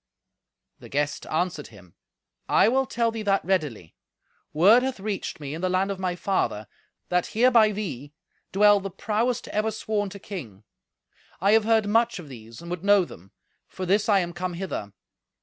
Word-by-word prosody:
The -, -, -13 dB
guest 145 Hz, +1 st, -2 dB
answered 160 Hz, -2 st, -2 dB
him, 95 Hz, -6 st, -17 dB, 0.6 s
"I -, -, +5 dB
will 265 Hz, +2 st, +1 dB
tell 235 Hz, -1 st, 0 dB
thee 225 Hz, -1 st, -5 dB
that 200 Hz, -4 st, +1 dB
readily. 150 Hz, -, -2 dB, 0.6 s
Word 200 Hz, +11 st, +6 dB
hath 260 Hz, -3 st, -3 dB
reached 200 Hz, -4 st, -4 dB
me 145 Hz, -1 st, -6 dB
in 160 Hz, -, -6 dB
the 185 Hz, -, 0 dB
land 190 Hz, +2 st, +1 dB
of 195 Hz, -, -5 dB
my 180 Hz, -2 st, -1 dB
father, 170 Hz, -, -1 dB, 0.4 s
that, 180 Hz, -1 st, +1 dB
hereby 230 Hz, -3 st, +5 dB
thee, 155 Hz, -, -5 dB, 0.4 s
dwell 205 Hz, +1 st, +5 dB
the 195 Hz, 0 st, -5 dB
prowest 225 Hz, +6 st, -1 dB
ever 215 Hz, +1 st, 0 dB
sworn 215 Hz, -2 st, -2 dB
to 200 Hz, -, -9 dB
king. 135 Hz, -, -9 dB, 0.8 s
I 195 Hz, +3 st, +3 dB
have 220 Hz, 0 st, +4 dB
heard 225 Hz, -1 st, +3 dB
much 230 Hz, +3 st, +2 dB
of 165 Hz, -6 st, -10 dB
these, 115 Hz, +2 st, -11 dB
and 170 Hz, -, -8 dB
would 180 Hz, 0 st, -4 dB
know 200 Hz, -2 st, +5 dB
them; 95 Hz, -, -14 dB, 0.4 s
for 185 Hz, -, -6 dB
this 205 Hz, +4 st, +1 dB
I 200 Hz, -2 st, +5 dB
am 175 Hz, -1 st, -4 dB
come 180 Hz, 0 st, -4 dB
hither. 170 Hz, -, -5 dB
190 Hz, 180 wpm, -25 LUFS, 160-215 Hz, 0.8 s, Word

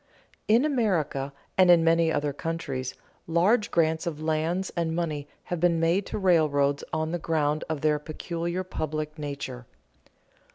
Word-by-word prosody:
_In 235 Hz, +6 st, +5 dB
America 175 Hz, -, 0 dB, 0.3 s
and 185 Hz, -1 st, +7 dB
in 170 Hz, -2 st, +7 dB
many 165 Hz, 0 st, +3 dB
other 145 Hz, -2 st, 0 dB
countries, 135 Hz, -5 st, -4 dB, 0.3 s
large 190 Hz, +7 st, +3 dB
grants 160 Hz, +1 st, +1 dB
of 155 Hz, -3 st, -3 dB
lands 160 Hz, +4 st, -1 dB
and 165 Hz, -2 st, -1 dB
money 155 Hz, -4 st, -2 dB, 0.2 s
have 175 Hz, -, -4 dB
been 170 Hz, -1 st, +3 dB
made 170 Hz, +4 st, +1 dB
to -, -, -4 dB
railroads 150 Hz, -7 st, +2 dB
on 160 Hz, 0 st, -1 dB
the 175 Hz, -, -2 dB
ground 155 Hz, -2 st, 0 dB
of 155 Hz, -3 st, -2 dB
their 150 Hz, -1 st, +2 dB
peculiar 170 Hz, +3 st, -4 dB
public 155 Hz, -3 st, -4 dB
nature. 140 Hz, -4 st, -6 dB
160 Hz, 150 wpm, -27 LUFS, 150-175 Hz, 0.3 s, and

